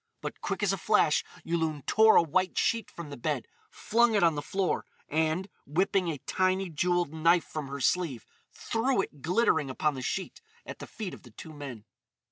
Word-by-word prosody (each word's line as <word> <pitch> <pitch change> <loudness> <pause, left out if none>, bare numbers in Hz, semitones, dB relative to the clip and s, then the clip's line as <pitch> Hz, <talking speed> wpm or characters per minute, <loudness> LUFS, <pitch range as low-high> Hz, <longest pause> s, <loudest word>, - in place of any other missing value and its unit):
But - - -6
quick - - -2
as - - +2
a - - -3
flash - - +3 0.2
Yulun 160 -4 -1
tore 220 0 +6
a - - +7
white 185 +4 0
sheet 230 -2 +1
from 165 -4 -9
the 140 - -7
bed, 120 - -2 0.2
flung 235 0 +2
it 205 - +3
on 165 -1 +5
the 145 - -3
floor, 190 +5 -1 0.2
and, 160 +4 0 0.2
whipping 185 +4 +1
a 160 -3 -2
tiny, 185 +6 0
jewelled 175 0 0
knife 165 +2 +3
from 155 -3 -5
her 140 +1 -6
sleeve, 140 -4 0 0.3
threw 230 -1 0
it 145 - -10
glittering 160 - +2
upon 150 +3 0
the 130 - -6
sheet 190 - -4 0.2
at - - -8
the - - -8
feet 210 -5 -6
of - - -11
the 125 - -15
two 155 +8 -11
men. 135 -7 -8
165 Hz, 195 wpm, -29 LUFS, 145-190 Hz, 0.3 s, a